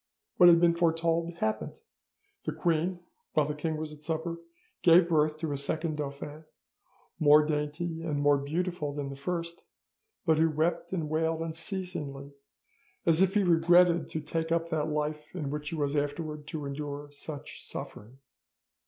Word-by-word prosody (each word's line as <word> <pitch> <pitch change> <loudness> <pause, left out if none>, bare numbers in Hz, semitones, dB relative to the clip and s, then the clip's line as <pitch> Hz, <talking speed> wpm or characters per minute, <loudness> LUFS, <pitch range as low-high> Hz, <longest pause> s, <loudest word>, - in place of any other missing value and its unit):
"'What 175 -1 +9
had 170 -1 +7
been 170 0 +5
foretold 165 0 +1
happened: 110 - -2 0.7
the - - -1
queen, 170 +3 0 0.3
while 150 - +3
the 150 - -2
king 155 +1 -2
was 155 0 -5
at 150 - -14
supper, 165 +1 -3 0.4
gave 170 0 +6
birth 155 -1 +2
to 160 -1 -3
a 140 - -1
second 155 +3 -2
dauphin, 145 +2 -6 0.7
more 150 0 +7
dainty 155 +2 -2
and 155 -3 -2
more 145 0 +4
beautiful 155 +1 -2
than 145 -1 -4
the 140 - -6
first, 170 +4 -4 0.6
but 160 -2 +3
who 165 0 +4
wept 160 +2 0
and 165 -5 -2
wailed 160 +1 0
unceasingly, 160 -4 -5 0.7
as 165 +1 +4
if 190 +1 +3
he 205 - +4
regretted 175 0 +4
to 160 - -3
take 160 +2 -3
up 165 0 +1
that 155 -1 0
life 150 +1 -3
in 150 -6 -3
which 150 0 -4
he 165 - -4
was 145 -1 -1
afterwards 150 +1 -2
to 150 -2 -5
endure 145 +1 -5
such 145 0 -8
suffering. 115 +6 -8
155 Hz, 160 wpm, -29 LUFS, 150-170 Hz, 0.7 s, What